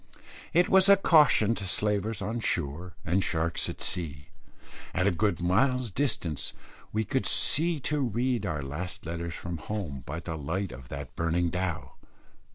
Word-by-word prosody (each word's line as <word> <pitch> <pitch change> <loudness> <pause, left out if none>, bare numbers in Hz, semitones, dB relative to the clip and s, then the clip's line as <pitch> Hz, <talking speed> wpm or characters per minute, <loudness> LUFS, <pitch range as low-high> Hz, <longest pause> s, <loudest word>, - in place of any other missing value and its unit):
It 175 +2 +4
was 190 +1 +5
a 200 - +8
caution 150 - +5
to 100 -4 -5
slavers 105 +2 0
on 110 +4 -2
shore 85 -2 -2
and 90 +4 +1
sharks 85 0 -1
at - - -7
sea. 75 -4 -1 0.7
At 90 - +1
a 100 - +4
good 85 +1 0
mile's 120 +7 +1
distance 90 - -1 0.4
we 110 +1 0
could 130 +6 0
see 165 +2 +4
to 150 +2 0
read 125 0 0
our 75 -2 -3
last 75 +8 -5
letters 85 0 -4
from 85 -1 -6
home, 85 -11 -5
by 80 +3 -4
the 80 -2 -6
light 85 +6 -3
of 60 -1 -11
that - - -7
burning 85 +1 0
dhow. 90 -4 -3
95 Hz, 165 wpm, -28 LUFS, 85-115 Hz, 0.7 s, a